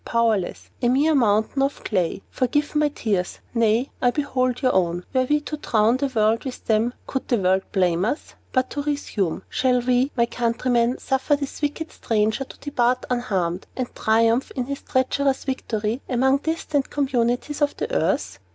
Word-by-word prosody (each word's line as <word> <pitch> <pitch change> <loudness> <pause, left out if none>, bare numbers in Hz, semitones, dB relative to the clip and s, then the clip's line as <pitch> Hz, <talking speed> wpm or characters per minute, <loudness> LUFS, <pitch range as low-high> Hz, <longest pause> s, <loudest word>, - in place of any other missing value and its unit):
Powerless! 225 -6 0
A 240 - +3
mere 290 +5 +3
mountain 220 0 +2
of 275 +1 -1
clay! 185 -2 -1
Forgive 290 +3 0
my 300 0 +3
tears! 205 -10 -2 0.2
Nay, 230 +2 +2
I 245 - +4
behold 255 -3 0
your 255 - +3
own. 175 -1 +1
Were 260 -1 +3
we 295 +3 +2
to 305 +1 -5
drown 225 -3 +2
the 280 +1 0
world 225 -2 +1
with 260 -2 -7
them, 225 +2 +1
could 265 - -4
the 240 - +2
world 190 -1 +2
blame 180 -2 +2
us? 265 +7 -3 0.2
"But 255 -1 +1
to 290 - -2
resume: 225 - -2
Shall 255 -1 +2
we, 250 +2 +2
my 235 - +4
countrymen, 240 +1 0
suffer 265 +2 +1
this 280 0 -6
wicked 310 +2 -2
stranger 220 +3 0
to - - -13
depart 255 -3 0
unharmed, 190 -8 -1
and 255 -2 -3
triumph 230 +3 +2
in 255 - -1
his 280 +1 -5
treacherous 265 +1 0
victory, 230 -3 -2
among 265 +2 +3
distant 295 -2 -1
communities 265 +1 0
of 290 0 +1
the 470 +2 -3
earth? - - 0
250 Hz, 170 wpm, -23 LUFS, 220-275 Hz, 0.2 s, I